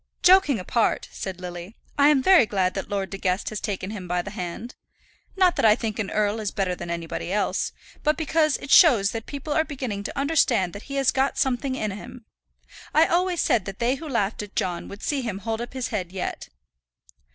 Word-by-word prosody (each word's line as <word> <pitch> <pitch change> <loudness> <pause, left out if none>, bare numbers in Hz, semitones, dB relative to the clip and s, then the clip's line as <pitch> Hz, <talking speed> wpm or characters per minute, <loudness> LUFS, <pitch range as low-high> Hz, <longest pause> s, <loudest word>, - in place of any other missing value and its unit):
"Joking 360 -8 +6
apart," 220 +4 0
said 190 -2 -6
Lily, 180 +3 -8 0.2
"I 285 0 +5
am 280 -3 +3
very 365 - +6
glad 190 -3 0
that 195 - -5
Lord 195 -2 -2
De 195 - -6
Guest 185 0 0
has 215 - -4
taken 195 -1 -3
him 195 -4 -7
by 175 0 -1
the 200 - -7
hand. 195 +4 -6 0.6
Not 370 -2 +4
that - - +1
I 215 -1 +7
think 220 -2 -4
an 205 - -2
earl 210 +1 0
is 210 -2 -2
better 195 -3 -1
than 175 - -7
anybody 170 +1 -4
else, 205 +1 0 0.3
but 300 +1 +1
because 310 -1 +2
it 270 - -8
shows 225 - +7
that 225 -1 -6
people 285 +1 -4
are 315 - +3
beginning 255 -9 -4
to - - -5
understand 275 - +2
that 200 - -10
he 275 - -4
has 275 -2 +3
got 270 +1 0
something 260 0 0
in 215 -5 -2
him. 215 +4 -10 0.7
I 315 +2 +7
always 355 0 +1
said 215 -6 +2
that 195 -1 -6
they 240 +2 +1
who 305 +3 -6
laughed 220 -5 -1
at 205 -1 -10
John 175 -2 -2
would 200 - -10
see 285 -2 0
him 225 -6 -3
hold 225 +2 -3
up 240 - -6
his 260 -2 -3
head 185 -5 -3
yet." 190 -1 -5
220 Hz, 220 wpm, -24 LUFS, 195-275 Hz, 0.7 s, I